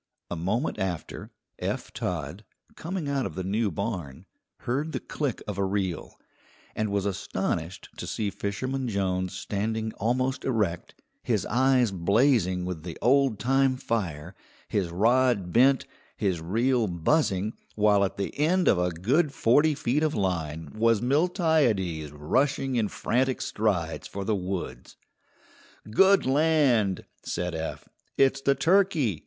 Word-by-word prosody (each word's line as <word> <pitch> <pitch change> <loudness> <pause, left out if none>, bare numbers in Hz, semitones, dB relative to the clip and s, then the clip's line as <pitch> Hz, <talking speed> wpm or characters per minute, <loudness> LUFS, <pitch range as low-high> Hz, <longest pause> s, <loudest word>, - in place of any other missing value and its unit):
A - - -1
moment 105 - -1
after, 95 -4 -4 0.3
Eph - - -3
Todd, 90 +3 -4 0.3
coming 170 -2 -4
out 140 -2 0
of - - -10
the 95 - -3
new 105 +3 0
barn, 90 -7 -5 0.4
heard 145 +6 -2
the - - -1
click 145 -6 -3
of 100 -2 -4
a - - +2
reel, 95 -3 -2 0.6
and 110 -1 -1
was 100 -1 0
astonished 95 -3 -3
to - - -6
see 105 -2 -2
Fisherman 130 +8 -3
Jones 95 -3 -1
standing 110 +3 -3
almost 130 +4 0
erect, 105 -9 -1 0.3
his - - 0
eyes 130 -1 +3
blazing 95 0 +2
with 90 -3 -4
the 85 0 -7
old 135 -2 +3
time 135 +3 +2
fire, 90 - -3 0.3
his 95 -4 -1
rod 110 0 +2
bent, 130 +3 +4 0.3
his 90 -5 -1
reel 115 +7 +1
buzzing, 100 - +1 0.2
while 105 -1 +4
at 95 - -2
the 100 - -3
end 175 +4 +2
of 90 - +4
a 90 0 +1
good 130 - +1
forty 145 +5 +3
feet 145 0 0
of 155 -1 +1
line 80 -6 -2
was 115 0 +3
Miltiades 125 - +1
rushing 130 - 0
in 115 -3 +1
frantic 130 +5 0
strides 95 -7 -1
for 100 0 -6
the 110 - +1
woods. 90 -9 -5 0.9
"Good 195 - +5
land!" 135 - +2 0.2
said 90 0 -3
Eph; 80 0 -5 0.3
"it's 135 0 +3
the 140 0 +3
turkey! 165 - +2
110 Hz, 140 wpm, -27 LUFS, 90-135 Hz, 0.9 s, Good